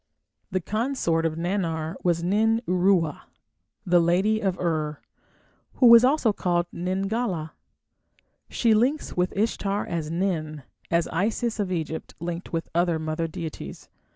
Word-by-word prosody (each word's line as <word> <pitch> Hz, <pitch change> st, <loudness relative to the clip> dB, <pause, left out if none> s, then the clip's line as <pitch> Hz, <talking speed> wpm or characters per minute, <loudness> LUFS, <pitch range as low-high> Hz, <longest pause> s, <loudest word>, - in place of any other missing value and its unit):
The 185 Hz, -, 0 dB
consort 210 Hz, -7 st, 0 dB
of 155 Hz, -, -4 dB
Nannar 165 Hz, -2 st, -2 dB
was 170 Hz, -1 st, +1 dB
Nin 220 Hz, +5 st, +2 dB
Uruwa, 180 Hz, -4 st, +2 dB, 0.6 s
"the 175 Hz, -1 st, +4 dB
lady 185 Hz, +6 st, +2 dB
of 190 Hz, -4 st, -1 dB
Ur", 155 Hz, -4 st, -1 dB, 0.8 s
who 255 Hz, -, +3 dB
was 235 Hz, 0 st, +9 dB
also 260 Hz, -4 st, +3 dB
called 175 Hz, -3 st, 0 dB
Nin 185 Hz, +3 st, -2 dB
gala. 195 Hz, -7 st, -2 dB, 1.0 s
She 230 Hz, -2 st, +2 dB
links 255 Hz, +8 st, +1 dB
with 180 Hz, +1 st, +1 dB
Ishtar 205 Hz, -1 st, 0 dB
as 165 Hz, -3 st, -3 dB
Nin, 160 Hz, -4 st, -2 dB, 0.3 s
as 170 Hz, 0 st, +2 dB
Isis 225 Hz, +5 st, -1 dB
of 195 Hz, -3 st, -1 dB
Egypt 160 Hz, -2 st, -4 dB
linked 170 Hz, +1 st, -5 dB
with 165 Hz, -1 st, -2 dB
other 170 Hz, -1 st, +2 dB
mother 155 Hz, +1 st, -2 dB
deities. 165 Hz, -2 st, -7 dB
180 Hz, 135 wpm, -25 LUFS, 165-210 Hz, 1.0 s, was